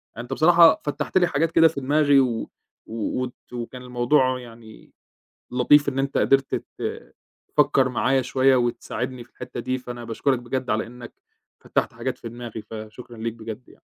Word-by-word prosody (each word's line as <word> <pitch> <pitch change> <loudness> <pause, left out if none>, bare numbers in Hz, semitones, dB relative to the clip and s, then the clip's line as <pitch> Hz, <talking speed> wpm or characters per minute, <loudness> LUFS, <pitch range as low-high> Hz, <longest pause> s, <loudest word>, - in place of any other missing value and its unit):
يعني 120 - -6
أنت 125 - -5
بصراحة 170 +2 +6
فتّحت 150 +4 -1
لي 180 -1 +4
حاجات 165 +1 0
كده 165 0 +6
في 155 -3 -4
دماغي، 145 +1 +4
و 120 -4 0 0.4
و 110 - -8 0.3
وت 125 - -5 0.2
وكان 125 +1 -6
الموضوع 125 +1 +1
يعني 115 -2 -14 0.6
لطيف 145 +4 +4
إن 135 -1 -1
أنت 135 +1 0
قدرت 135 0 +2
ت - - -6 0.3
تفكّر 140 -3 +3
معايا 130 +1 +1
شوية 130 +1 +3
وتساعدني 125 +1 -2
في 120 - -27
الحِتّة 120 - -7
دي، 130 +2 -2
فأنا 120 -1 -8
باشكرك 120 +3 0
بجد 125 +1 -4
على 110 +1 0
إنّك 120 0 -11 0.5
فتّحت - - -1
حاجات - - -4
في 115 - -7
دماغي، 115 -2 -8
فشكرًا 110 +3 -10
ليك 115 0 -3
بجد 115 +1 -8
يعني. - - -20
125 Hz, 170 wpm, -24 LUFS, 120-135 Hz, 0.6 s, بصراحة